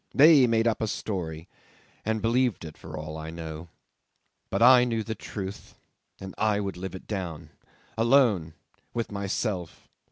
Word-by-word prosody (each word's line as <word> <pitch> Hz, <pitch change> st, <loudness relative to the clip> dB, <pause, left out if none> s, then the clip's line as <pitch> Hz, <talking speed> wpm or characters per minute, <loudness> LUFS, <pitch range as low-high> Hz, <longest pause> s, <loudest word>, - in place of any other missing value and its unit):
They 145 Hz, -3 st, +7 dB
made 115 Hz, 0 st, +2 dB
up 115 Hz, -, 0 dB
a 110 Hz, -, 0 dB
story, 85 Hz, -7 st, -4 dB, 0.6 s
and 110 Hz, -1 st, -1 dB
believed 120 Hz, -5 st, +1 dB
it 75 Hz, -, -9 dB
for -, -, -9 dB
all 75 Hz, +1 st, -6 dB
I 80 Hz, 0 st, -6 dB
know. 80 Hz, 0 st, -7 dB, 0.8 s
But -, -, +1 dB
I 125 Hz, 0 st, +8 dB
knew 115 Hz, -2 st, -1 dB
the 110 Hz, -, -4 dB
truth, 100 Hz, -3 st, -7 dB, 0.4 s
and 95 Hz, -1 st, -8 dB
I 105 Hz, -1 st, +2 dB
would 100 Hz, -2 st, -3 dB
live 95 Hz, +1 st, -6 dB
it 95 Hz, -, -10 dB
down 90 Hz, -7 st, -5 dB, 0.5 s
alone, 115 Hz, -, +3 dB, 0.4 s
with 115 Hz, -2 st, -2 dB
myself. 100 Hz, -2 st, -3 dB
100 Hz, 155 wpm, -27 LUFS, 85-115 Hz, 0.8 s, I